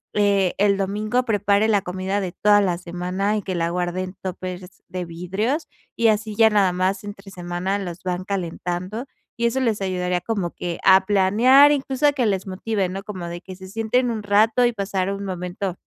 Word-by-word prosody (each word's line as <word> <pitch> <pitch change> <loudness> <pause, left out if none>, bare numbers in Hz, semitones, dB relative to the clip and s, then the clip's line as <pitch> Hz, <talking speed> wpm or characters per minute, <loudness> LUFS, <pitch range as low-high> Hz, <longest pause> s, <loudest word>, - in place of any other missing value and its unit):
eh, 200 -3 +3
el 200 -1 +3
domingo 210 +5 0
prepare 205 -1 +2
la 205 -3 +3
comida 190 +2 -2
de 180 -3 -4
toda 205 0 +4
la 180 -3 0
semana 180 +4 -2
y - - -2
que 185 -1 -4
la 170 -1 0
guarden 180 +1 -2
en - - -22
tópers 185 0 -7
de 180 -1 -4
vidrios 190 - -2 0.3
y, 230 -1 +3
así 215 0 0
ya 225 +1 +6
nada 200 -3 +3
más 185 +3 0
entre 200 -1 -9
semana 180 +2 -3
los 180 -3 -6
van 180 0 -2
calentando, 185 +3 -3 0.3
y 235 0 +2
eso 245 +3 -1
les 225 -5 0
ayudaría 180 -1 -1
como 195 -4 -2
que 175 -1 -5
a 190 0 +6
planear, 225 +9 +6
incluso, 275 0 0
a 290 - +3
que 260 -4 0
les 190 -2 -1
motive, 195 0 -2
¿no?, 190 +2 -5
como 190 -5 -6
de 170 0 -6
que 185 0 -10
se 190 0 -11
sienten 225 +5 0
un 220 -2 -3
rato 215 +4 +3
y 240 - +3
pasar 195 -2 -2
un 200 0 -4
momento 180 0 -4
195 Hz, 200 wpm, -22 LUFS, 180-215 Hz, 0.3 s, ya